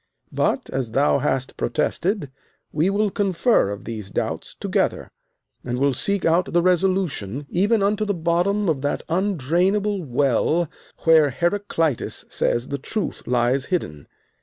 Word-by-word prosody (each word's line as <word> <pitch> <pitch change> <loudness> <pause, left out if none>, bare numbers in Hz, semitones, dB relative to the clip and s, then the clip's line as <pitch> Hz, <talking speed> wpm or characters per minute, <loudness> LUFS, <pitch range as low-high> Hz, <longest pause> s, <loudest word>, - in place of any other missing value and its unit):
But, - - 0
as 125 -4 -3
thou 140 +2 +3
hast 130 0 -1
protested, 170 - -1 0.4
we 160 +5 +1
will 205 +1 +1
confer 195 - +2
of 100 0 -6
these 110 -4 -6
doubts - - -3
together, - - -1 0.5
and 120 0 -3
will 140 +1 +2
seek 195 +9 -1
out 170 +2 +2
the 175 - +4
resolution, 180 - 0
even 200 +4 +2
unto 210 +2 +1
the 205 -2 -1
bottom 175 +5 +1
of 150 -5 0
that 145 - -1
undrainable 190 +3 +1
well 140 +5 +1 0.4
where 160 -3 +6
Heraclitus 170 - -1
says 120 +1 -1
the 140 - -3
truth 210 +9 -4
lies 125 +2 +1
hidden. 75 - -3
165 Hz, 135 wpm, -22 LUFS, 135-195 Hz, 0.5 s, where